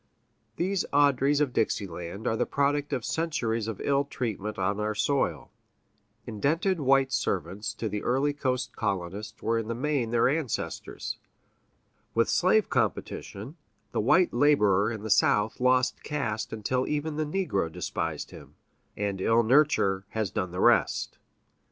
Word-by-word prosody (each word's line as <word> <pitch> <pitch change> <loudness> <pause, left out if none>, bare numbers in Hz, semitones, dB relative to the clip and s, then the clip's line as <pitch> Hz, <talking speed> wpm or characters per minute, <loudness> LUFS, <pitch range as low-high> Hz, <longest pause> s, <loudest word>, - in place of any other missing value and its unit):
These 185 +2 0
Audreys 140 0 +3
of 140 -4 +1
Dixie 110 -2 0
land 90 +4 -7
are 110 - +1
the - - 0
product 145 +1 0
of 125 - -2
centuries 115 -9 -1
of 110 -3 -4
ill 140 0 +2
treatment 110 -6 -4
on 100 +2 0
our 105 0 -1
soil; 140 +6 0 0.7
indented 160 - 0
white 135 -1 +3
servants 105 +3 -2
to 110 - -3
the 105 -1 -3
early 135 +4 +1
coast 130 -3 -2
colonists 100 0 -3
were 115 0 +1
in 110 - -5
the 115 - -2
main 135 -2 -1
their 115 0 +3
ancestors; 140 -3 -3 1.0
with 115 0 +3
slave 190 +4 +3
competition, 115 - -3 0.3
the - - 0
white 185 -1 +3
laborer 110 -7 +3
in 110 -3 -6
the 110 - -3
South 105 +2 +3
lost 125 0 +2
caste 115 -7 -3
until 125 +4 -1
even 150 +1 -2
the 155 - +1 0.2
negro 85 -5 -1
despised 80 -1 -4
him; - - -13 0.4
and 100 -2 -2
ill 115 +3 +3
nurture 110 -7 +3
has 110 -4 -2
done 95 - -2
the 90 +1 -6
rest. - - +2
115 Hz, 150 wpm, -27 LUFS, 105-145 Hz, 1.0 s, Audreys